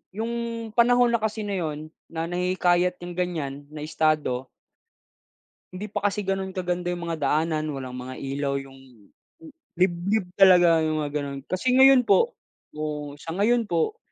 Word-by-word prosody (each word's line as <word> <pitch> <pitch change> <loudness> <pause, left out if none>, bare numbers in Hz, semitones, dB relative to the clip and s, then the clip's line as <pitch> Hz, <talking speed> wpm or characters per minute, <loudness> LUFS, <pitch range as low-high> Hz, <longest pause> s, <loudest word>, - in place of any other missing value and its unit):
'yung 230 0 -3
panahon 245 +1 +5
na 235 - +2
kasi 220 0 -2
na 200 -2 -3
'yun 155 -2 -4 0.2
na 165 0 -4
nahihikayat 180 0 +1
yang 175 0 -7
ganiyan 150 -6 -3
na 150 - -7
estado 150 -4 0 1.3
Hindi 200 +3 -6
pa 205 - -2
kasi 205 +1 -2
ganun 190 0 -3
kaganda 180 -1 -2
'yung 175 -1 -3
mga 165 -1 -3
daanan, 155 +2 0
walang 130 -2 -6
mga 130 +1 -7
ilaw 140 0 -2
'yung 135 -5 -10 0.7
liblib 180 +2 +1
talaga 180 -4 +7
'yung 155 0 0
mga 145 -1 -3
gano'n. 140 -1 -4
Kasi 250 +8 0
ngayon 265 -1 +7
po 480 - +3 0.4
oo, 150 -1 -4
sa 165 +2 -7
ngayon 230 +5 +2
po, 175 - -1
175 Hz, 155 wpm, -25 LUFS, 150-205 Hz, 1.3 s, talaga